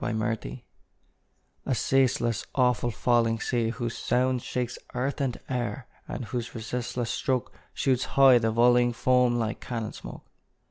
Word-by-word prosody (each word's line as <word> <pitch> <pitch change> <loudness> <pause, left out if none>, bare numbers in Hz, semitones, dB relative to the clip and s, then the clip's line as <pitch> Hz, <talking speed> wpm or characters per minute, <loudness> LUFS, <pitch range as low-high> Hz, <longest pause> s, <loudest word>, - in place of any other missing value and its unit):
NIAGARA 110 - -3 1.0
A 130 - +1
ceaseless, 120 -3 +1
awful, 125 -2 +2
falling 115 -1 +1
sea, 115 0 0
whose 120 0 -4
sound 125 0 +1
Shakes 125 0 -3 0.2
earth 135 +4 -1
and 130 -3 -1
air, 120 -2 -3 0.2
and 125 - -5
whose 120 0 -5
resistless 120 +1 -3
stroke 130 +1 -1 0.2
Shoots 130 -2 +1
high 135 -3 +8
the 115 -1 +1
volleying 120 +1 +4
foam 125 0 +3
like 115 -1 -2
cannon 115 -3 -4
smoke! - - -10
120 Hz, 135 wpm, -27 LUFS, 115-125 Hz, 1.0 s, high